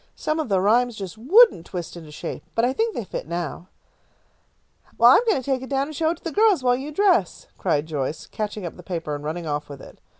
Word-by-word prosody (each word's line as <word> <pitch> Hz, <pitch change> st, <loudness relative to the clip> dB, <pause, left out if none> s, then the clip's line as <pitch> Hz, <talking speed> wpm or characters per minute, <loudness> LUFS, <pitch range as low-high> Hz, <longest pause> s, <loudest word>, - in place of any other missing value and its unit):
Some 310 Hz, +1 st, -2 dB
of 310 Hz, -, -2 dB
the 195 Hz, -2 st, +2 dB
rhymes 235 Hz, +5 st, +2 dB
just 195 Hz, -3 st, -7 dB
wouldn't 325 Hz, -, +5 dB
twist 175 Hz, -3 st, -6 dB
into 165 Hz, -3 st, -10 dB
shape, 150 Hz, -, -6 dB
but 230 Hz, -, +3 dB
I 255 Hz, -, +1 dB
think 450 Hz, +7 st, -1 dB
they 235 Hz, -, -3 dB
fit 190 Hz, -, -6 dB
now." 170 Hz, +1 st, -4 dB, 1.3 s
"I'm -, -, +7 dB
going 435 Hz, -, +3 dB
to -, -, -8 dB
take 265 Hz, -1 st, -1 dB
it 260 Hz, -, -8 dB
down 275 Hz, 0 st, +1 dB
and 310 Hz, -, -8 dB
show 320 Hz, +2 st, +1 dB
it 340 Hz, -, -2 dB
to -, -, -26 dB
the 330 Hz, -, -3 dB
girls, 410 Hz, -8 st, +3 dB
while 245 Hz, -1 st, +3 dB
you 275 Hz, +4 st, -6 dB
dress," 350 Hz, -, +2 dB
cried 145 Hz, +1 st, 0 dB
Joyce, 150 Hz, -1 st, -4 dB
catching 210 Hz, -2 st, -5 dB
up 170 Hz, -, -7 dB
the -, -, -10 dB
paper 165 Hz, -4 st, -4 dB
and 145 Hz, 0 st, -5 dB
running 165 Hz, +3 st, -4 dB
off 150 Hz, -1 st, -3 dB
with 140 Hz, -1 st, -9 dB
it. -, -, -14 dB
215 Hz, 240 wpm, -23 LUFS, -, 1.3 s, I'm